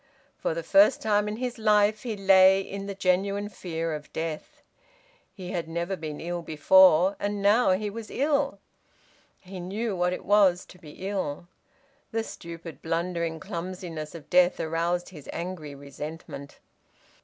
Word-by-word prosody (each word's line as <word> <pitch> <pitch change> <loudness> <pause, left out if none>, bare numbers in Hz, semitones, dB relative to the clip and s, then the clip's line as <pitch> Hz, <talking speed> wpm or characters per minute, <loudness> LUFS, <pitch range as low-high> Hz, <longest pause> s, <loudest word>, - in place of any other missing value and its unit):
For - - -2
the - - -3
first 295 -2 +5
time 210 -1 +1
in 210 - -3
his 245 0 -4
life 210 -1 +3
he 225 -4 -4
lay 190 -1 +6
in 195 +1 -6
the 200 - -5
genuine 195 +2 0
fear 165 -5 -4
of 150 -1 -7
death. 160 -1 -5 0.7
He 185 -2 -8
had 170 -2 -3
never 170 +3 -2
been 155 -4 -6
ill 175 +1 -4
before. 180 +3 +5
And 205 0 -2
now 205 0 +4
he 210 +3 -1
was 225 +1 -8
ill. 280 -4 0 0.8
He 185 0 -9
knew 200 +4 -3
what 180 0 +1
it 180 - -5
was 195 -3 +4
to 180 - -14
be 170 +3 -9
ill. 175 -5 -3 0.6
The 225 0 -1
stupid, 170 -6 -9
blundering 165 0 -2
clumsiness 170 -2 -6
of 155 -3 -10
death 180 0 +4
aroused 170 +2 -1
his 155 -7 -12
angry 170 -5 -6
resentment. 140 +1 -8
185 Hz, 155 wpm, -27 LUFS, 165-205 Hz, 0.8 s, lay